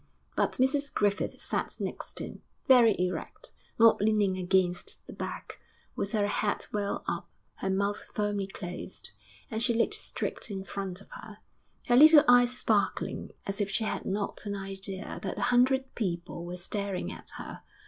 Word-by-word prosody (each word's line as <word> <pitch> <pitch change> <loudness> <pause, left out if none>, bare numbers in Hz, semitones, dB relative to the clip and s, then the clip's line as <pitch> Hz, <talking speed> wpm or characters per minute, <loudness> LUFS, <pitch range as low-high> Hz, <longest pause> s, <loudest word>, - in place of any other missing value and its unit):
But - - +1
Mrs 280 +2 +1
Griffith 205 0 0
sat - - -2
next - - -5
him, - - -7 0.3
very 240 -6 +7
erect, 180 0 -3 0.3
not 225 -3 +6
leaning 210 -3 +3
against 180 -1 0
the - - -9
back, - - -6 0.4
with 200 - -2
her 210 -2 +2
head 205 0 0
well 205 -1 -1
up, - - -3 0.3
her 190 - -2
mouth 200 +2 0
firmly 205 -2 0
closed, 180 - -6 0.4
and 220 - -2
she 235 -1 +3
looked 230 - +2
straight - - -1
in 195 -2 -4
front 195 -1 -5
of - - -18
her, 215 -2 -10 0.5
her 240 - +4
little 300 +2 +9
eyes 245 0 +6
sparkling, 210 -4 0 0.2
as 195 +1 -2
if 200 - 0
she 195 +3 0
had 215 - -2
not 200 +1 -2
an 200 - -2
idea 195 0 -5
that 190 - -4
a - - -3
hundred 265 +2 +3
people 170 -4 -3
were 175 +1 -5
staring 200 +1 -2
at - - -10
her. - - -8
205 Hz, 165 wpm, -29 LUFS, 190-230 Hz, 0.5 s, little